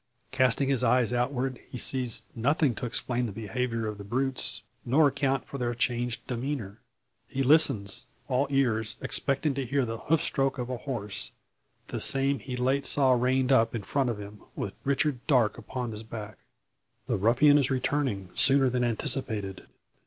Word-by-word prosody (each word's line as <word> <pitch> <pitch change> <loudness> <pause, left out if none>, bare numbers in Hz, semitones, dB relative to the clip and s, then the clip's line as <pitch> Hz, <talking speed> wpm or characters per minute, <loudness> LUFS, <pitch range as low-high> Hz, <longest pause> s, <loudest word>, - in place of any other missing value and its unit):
Casting 130 +2 +3
his 135 -3 +1
eyes 125 0 +3
outward, 125 +1 -1
he - - -6
sees 125 -1 -1
nothing 140 +3 +1
to 120 - -4
explain 120 0 -1
the - - -5
behaviour 115 +2 -3
of 105 -1 -5
the - - -7
brutes, 130 +5 -2 0.2
nor 145 +5 +4
account 135 -1 0
for 140 - -7
their 120 -1 -1
changed 120 -1 -1
demeanour. 120 -5 -4 0.5
He 135 0 -2
listens, 130 -9 +3 0.2
all 130 +2 +1
ears, 120 -6 +1
expecting 140 +1 +1
to 135 0 -2
hear 135 +1 0
the 115 -1 -5
hoof 160 0 +1
stroke 135 0 0
of 125 0 -4
a 125 - -2
horse 105 -6 -4 0.6
the - - -3
same 135 +1 +1
he 125 -2 -6
late 130 +2 +1
saw 135 -2 +3
reined 130 +2 +2
up 115 -3 +3
in 110 - -4
front 135 +4 0
of 115 - -2
him, 105 +1 -10
with 100 - -4
Richard 140 -1 +1
Darke 125 -8 +3
upon 125 -3 -5
his 105 0 -6
back. 110 -1 -8 0.7
The - - 0
ruffian 130 +8 +5
is 135 - +2
returning 130 -7 -1
sooner 135 -1 +4
than 125 0 0
anticipated. 110 -4 -1
125 Hz, 170 wpm, -28 LUFS, 115-135 Hz, 0.7 s, ruffian